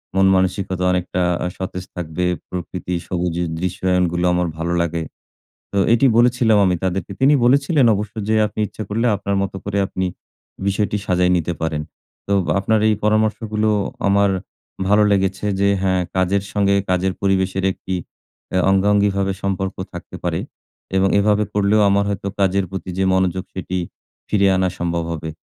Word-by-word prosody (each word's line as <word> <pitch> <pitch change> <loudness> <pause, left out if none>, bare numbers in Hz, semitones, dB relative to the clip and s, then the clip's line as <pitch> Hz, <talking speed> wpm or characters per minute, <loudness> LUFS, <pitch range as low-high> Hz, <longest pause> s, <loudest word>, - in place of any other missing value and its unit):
মন-মানসিকতা 95 -1 +2
অনেকটা 90 0 -1 0.2
আ - - 0
সতেজ 90 -1 -5
থাকবে। 90 0 -3 0.2
প্রকৃতি 90 0 -5
সবুজের 90 -1 -1
দৃশ্যায়নগুলো 90 -1 0
আমার 90 0 +1
ভালো 85 +1 -2
লাগে।" 85 -1 -1 0.7
তো 100 - -2 0.2
এটি 120 +4 +3
বলেছিলাম 120 -2 +4
আমি 90 -1 +2
তাদেরকে 95 0 -2
তিনি 135 +3 +6
বলেছিলেন 140 +2 +3
অবশ্য 105 +1 -4
যে, 110 - +2
"আপনি 105 - -9
ইচ্ছা 110 - -7
করলে 115 +3 0
আপনার 100 0 -2
মত 100 - -3
করে 100 0 -2
আপনি 95 0 -2 0.6
বিষয়টি 105 +1 0
সাজায় 90 -1 +2
নিতে 85 0 -2
পারেন।" 80 -2 -1 0.5
তো 100 - +1 0.3
আপনার 110 +3 +2
এই 110 - +2
পরামর্শগুলো 110 0 +1 0.4
আমার 100 0 +4 0.6
ভালো 105 +2 +5
লেগেছে 95 0 0
যে 100 0 +3
হ্যাঁ 95 -1 +1
কাজের 95 +1 +1
সঙ্গে 100 -1 +2
কাজের 95 +1 +1
পরিবেশের 95 -1 +1
একটি, 95 0 -5 0.6
অ্যা 95 - +1
অঙ্গাঙ্গীভাবে 100 0 +2
সম্পর্ক 95 -1 -2 0.2
থাকতে - - -9
পারে। - - -1 0.6
এবং 95 0 +3
এভাবে 105 +1 +3
করলেও 105 +1 +3
আমার 100 0 +3
হয়তো 100 0 -3
কাজের 95 0 +2
প্রতি 95 -1 -6
যে 95 - +1
মনোযোগ 95 0 +1
সেটি 95 0 -4 0.5
ফিরে 100 -1 +3
আনা 95 0 +1
সম্ভব 85 -1 -1
হবে। 80 -1 -4
95 Hz, 150 wpm, -20 LUFS, 90-100 Hz, 0.7 s, তিনি